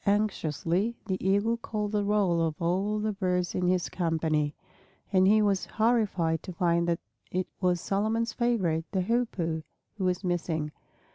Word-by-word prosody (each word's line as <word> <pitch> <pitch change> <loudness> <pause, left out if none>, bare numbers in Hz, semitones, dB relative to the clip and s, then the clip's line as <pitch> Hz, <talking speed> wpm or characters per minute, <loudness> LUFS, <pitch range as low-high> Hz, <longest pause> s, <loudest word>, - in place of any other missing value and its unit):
Anxiously 200 0 +1
the 190 -3 -3
Eagle 205 +5 +2
called 210 -2 -3
the 210 -1 +1
roll 200 -5 +2
of 160 -2 -1
all 190 +5 0
the 215 0 0
birds 180 -3 0
in 180 -1 0
his 180 -1 +2
company; 160 -4 0 0.6
and 185 0 +5
he 215 +1 +5
was 200 -2 +1
horrified 210 -8 +1
to - - -7
find 170 -1 +2
that 170 -1 +1 0.3
it 185 0 0
was 180 -2 +2
Solomon's 220 +5 0
favorite, 190 -10 +1
the 190 - +2
Hoopoe, 180 -8 0 0.4
who - - -1
was 180 +1 0
missing. 165 -4 -1
185 Hz, 155 wpm, -28 LUFS, 170-210 Hz, 0.6 s, and